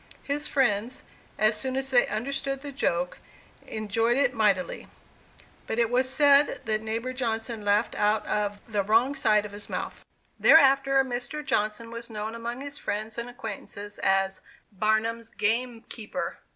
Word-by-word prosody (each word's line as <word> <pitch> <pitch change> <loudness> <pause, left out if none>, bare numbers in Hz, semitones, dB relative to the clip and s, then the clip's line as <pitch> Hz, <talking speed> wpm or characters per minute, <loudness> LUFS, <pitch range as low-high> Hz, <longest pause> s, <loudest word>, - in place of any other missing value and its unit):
His 290 +1 -1
friends, 245 -2 0 0.3
as 215 +1 +3
soon 260 +4 -3
as 270 0 -2
they 245 -2 +5
understood 275 +4 -2
the 285 0 -6
joke, 180 -9 -1 0.5
enjoyed 225 +3 0
it 275 -3 +3
mightily, 205 -5 +1 0.8
but 220 - -2
it 235 -1 +2
was 255 +1 +2
said 285 +1 +4
that 215 -1 0
neighbor 225 +3 -3
Johnson 225 -3 -3
laughed 205 +2 +2
out 210 +1 +1
of 205 -1 -1
"the 210 -3 0
wrong 225 +7 +3
side 215 -6 +2
of 210 - -8
his 205 0 -10
mouth." - - -5 0.4
Thereafter, 275 -2 +6
Mr. 250 +4 -4
Johnson 215 +1 -1
was 235 +1 -7
known 215 0 -4
among 235 +2 -5
his 285 +1 -6
friends 215 +2 -3
and 235 +1 -5
acquaintances 205 -4 -7
as 195 0 +1 0.3
"Barnum's 220 +3 0
game 230 +2 -1
keeper." 230 +4 -5
230 Hz, 150 wpm, -27 LUFS, 210-260 Hz, 0.8 s, Thereafter